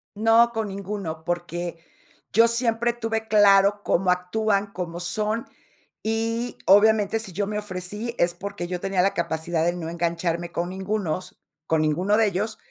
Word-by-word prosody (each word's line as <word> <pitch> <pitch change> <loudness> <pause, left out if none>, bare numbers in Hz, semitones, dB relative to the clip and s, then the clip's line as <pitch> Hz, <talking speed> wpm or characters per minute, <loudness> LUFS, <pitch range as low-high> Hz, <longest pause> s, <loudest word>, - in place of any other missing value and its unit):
No, 225 +2 +4
con 220 -1 -2
ninguno, 195 -5 -5
porque 175 0 -3 0.6
yo 230 +2 +6
siempre 235 0 +1
tuve 225 -1 -3
claro 205 -1 +5
cómo 185 +1 +1
actúan, 200 +3 0
cómo 175 -1 -5
son. 215 +5 -2 0.6
Y 230 +2 -2
obviamente 210 +2 +5
si 200 -5 -6
yo 200 +4 -1
me 210 0 -3
ofrecí 210 +4 -5
es, 175 0 +2
porque 190 0 -6
yo 180 0 -3
tenía 195 0 0
la 195 +2 +2
capacidad 160 0 -1
de 175 - +2
no 170 -2 -5
engancharme 170 0 -2
con 175 +1 -2
ningunos, 190 -2 -3 0.3
con 160 -1 +2
ninguno 175 +7 +2
de 225 -1 +4
ellos. 210 +3 -2
195 Hz, 155 wpm, -24 LUFS, 175-220 Hz, 0.6 s, yo